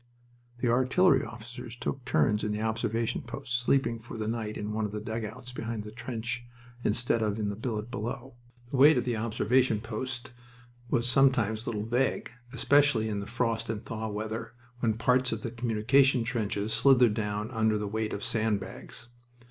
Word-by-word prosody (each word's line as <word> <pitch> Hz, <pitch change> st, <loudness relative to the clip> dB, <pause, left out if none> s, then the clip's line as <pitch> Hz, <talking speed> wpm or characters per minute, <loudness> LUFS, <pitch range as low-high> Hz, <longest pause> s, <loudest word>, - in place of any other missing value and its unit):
The 125 Hz, -, +1 dB
artillery 130 Hz, +5 st, +4 dB
officers 120 Hz, -1 st, -8 dB
took 130 Hz, +1 st, -4 dB
turns 105 Hz, -1 st, +2 dB
in 105 Hz, -, -1 dB
the 105 Hz, 0 st, -2 dB
observation 115 Hz, 0 st, -1 dB
posts, 135 Hz, -3 st, -5 dB
sleeping 120 Hz, -1 st, +1 dB
for 115 Hz, 0 st, -9 dB
the 110 Hz, -1 st, -3 dB
night 110 Hz, -2 st, -3 dB
in 105 Hz, +1 st, -4 dB
one 110 Hz, 0 st, -1 dB
of 105 Hz, -, -2 dB
the 105 Hz, -, -4 dB
dugouts 110 Hz, +3 st, -5 dB
behind 115 Hz, -3 st, -4 dB
the 105 Hz, -, -8 dB
front 110 Hz, -, -16 dB
trench 120 Hz, 0 st, -4 dB, 0.4 s
instead 115 Hz, +2 st, +1 dB
of 105 Hz, -1 st, 0 dB
in 105 Hz, -2 st, -1 dB
the 100 Hz, -, -3 dB
billet 110 Hz, 0 st, -4 dB
below. 120 Hz, +4 st, -5 dB, 0.4 s
The 135 Hz, -, -1 dB
way 145 Hz, +4 st, +8 dB
to 125 Hz, -, +2 dB
the 120 Hz, 0 st, -1 dB
observation 115 Hz, +1 st, +2 dB
post 120 Hz, +4 st, -5 dB, 0.6 s
was 120 Hz, 0 st, +3 dB
sometimes 125 Hz, -4 st, +3 dB
a -, -, +1 dB
little 105 Hz, -2 st, -3 dB
vague, 125 Hz, +3 st, 0 dB, 0.2 s
especially 135 Hz, -3 st, +3 dB
in 100 Hz, -1 st, -2 dB
frost 115 Hz, -1 st, -1 dB
and 110 Hz, 0 st, -4 dB
thaw 110 Hz, -2 st, -4 dB
weather, 110 Hz, +2 st, -4 dB, 0.3 s
when 115 Hz, -3 st, +1 dB
parts 125 Hz, +2 st, +2 dB
of -, -, -3 dB
the 120 Hz, -, -4 dB
communication 125 Hz, +3 st, +3 dB
trenches 110 Hz, -3 st, -2 dB
slithered 125 Hz, -5 st, +5 dB
down 105 Hz, +1 st, -2 dB
under 110 Hz, -2 st, +2 dB
the 105 Hz, 0 st, -3 dB
weight 110 Hz, +1 st, -2 dB
of 100 Hz, -, -4 dB
sand 110 Hz, -2 st, +1 dB
bags. 115 Hz, +3 st, -9 dB
115 Hz, 180 wpm, -29 LUFS, 110-125 Hz, 0.6 s, way